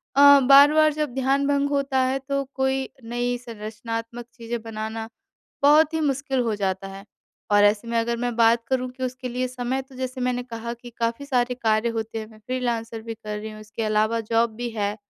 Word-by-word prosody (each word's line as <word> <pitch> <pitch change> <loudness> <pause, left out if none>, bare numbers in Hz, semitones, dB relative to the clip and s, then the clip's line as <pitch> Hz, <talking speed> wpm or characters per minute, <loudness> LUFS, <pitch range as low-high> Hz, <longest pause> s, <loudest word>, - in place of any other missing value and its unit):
अ, - - +3 0.2
बार-बार 290 +3 +6
जब 300 -4 -2
ध्यान 270 +1 +1
भंग 285 0 +1
होता 275 -1 0
है, 260 +1 +1
तो 275 +1 -2
कोई 265 0 0
नई 245 +1 -2
संरचनात्मक 230 0 -6
चीज़ें 235 -1 -5
बनाना 220 0 -5 0.5
बहुत 305 +2 +5
ही 320 - 0
मुश्किल 270 -2 0
हो 230 -3 0
जाता 195 -1 -2
है। 195 +1 -10 0.5
और 205 0 +5
ऐसे 210 +3 +2
में 230 0 0
अगर 235 +1 0
मैं 240 0 -2
बात 230 0 +4
करूँ 255 -1 0
कि 260 +1 -11
उसके 255 0 -4
लिए 250 +1 -2
समय 255 +1 -3
तो 265 0 -18
जैसे 255 0 -4
मैंने 250 0 0
कहा 235 -1 -6
कि 240 +1 -12
काफ़ी 230 +4 -1
सारे 250 -2 +1
कार्य 225 -2 +1
होते 225 -1 -3
हैं, 215 - -6
मैं 215 - -16
फ्रीलांसर 230 -1 -3
भी 225 0 -6
कर 210 -1 -6
रही 220 +1 -6
हूँ, 215 0 -10
इसके 215 +1 -6
अलावा 215 +1 +1
जॉब 225 0 +1
भी 240 0 -3
है 210 -1 -2
240 Hz, 205 wpm, -24 LUFS, 225-260 Hz, 0.5 s, बार-बार